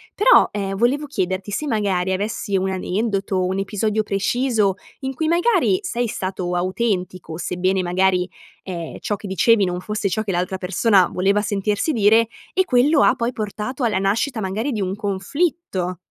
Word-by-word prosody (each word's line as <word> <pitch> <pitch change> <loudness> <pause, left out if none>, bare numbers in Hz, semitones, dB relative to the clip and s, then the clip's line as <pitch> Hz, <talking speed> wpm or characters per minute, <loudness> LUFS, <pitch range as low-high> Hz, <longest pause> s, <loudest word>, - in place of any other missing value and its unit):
Però, - - +6
ehm, 195 -1 -2
volevo 260 +7 +1
chiederti 190 -7 -3
se 300 +9 -2
magari 195 -6 0
avessi 200 +1 -2
un 190 0 +1
aneddoto, 195 0 -1
un 190 +1 -1
episodio 215 +2 -1
preciso 210 0 +1 0.2
in 265 -1 -4
cui 315 +4 -2
magari 370 +2 +3
sei 240 -9 -1
stato 185 -3 -3
autentico, 185 -3 -2
sebbene 185 +1 0
magari, 180 0 +1 0.3
ehm, 170 -4 -6
ciò 205 - -2
che 205 - -8
dicevi 200 +2 +3
non 180 0 -3
fosse 210 +1 -2
ciò 215 +4 -1
che 205 - -3
l'altra 180 +1 -1
persona 190 +1 +3
voleva 195 +3 +2
sentirsi 205 +6 -1
dire, 225 -1 +4 0.3
e 375 - +3
quello 280 -1 +3
ha - - +4
poi 235 +1 -2
portato 220 +4 -4
alla 210 -5 +1
nascita 220 +6 0
magari 215 +7 -2
di 220 - -2
un 190 0 -2
conflitto. 200 - -2
205 Hz, 165 wpm, -21 LUFS, 190-235 Hz, 0.3 s, Però